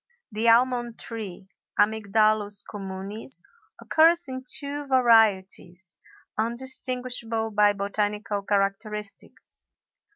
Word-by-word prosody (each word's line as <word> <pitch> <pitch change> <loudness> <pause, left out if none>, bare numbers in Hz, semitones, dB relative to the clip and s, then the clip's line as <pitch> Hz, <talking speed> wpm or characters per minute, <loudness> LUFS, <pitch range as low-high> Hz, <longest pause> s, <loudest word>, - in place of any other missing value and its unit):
The 220 +2 +1
almond 240 0 +2
tree, 205 -5 -8 0.3
Amygdalus 215 -1 +2
communis, 195 +4 -7 0.4
occurs 335 +1 +3
in 260 0 -5
two 285 +2 -3
varieties, 200 -8 +2 0.4
undistinguishable 240 -1 0
by 205 0 +4
botanical 205 +1 -2
characteristics. 200 +1 -3
215 Hz, 75 wpm, -25 LUFS, 205-245 Hz, 0.4 s, by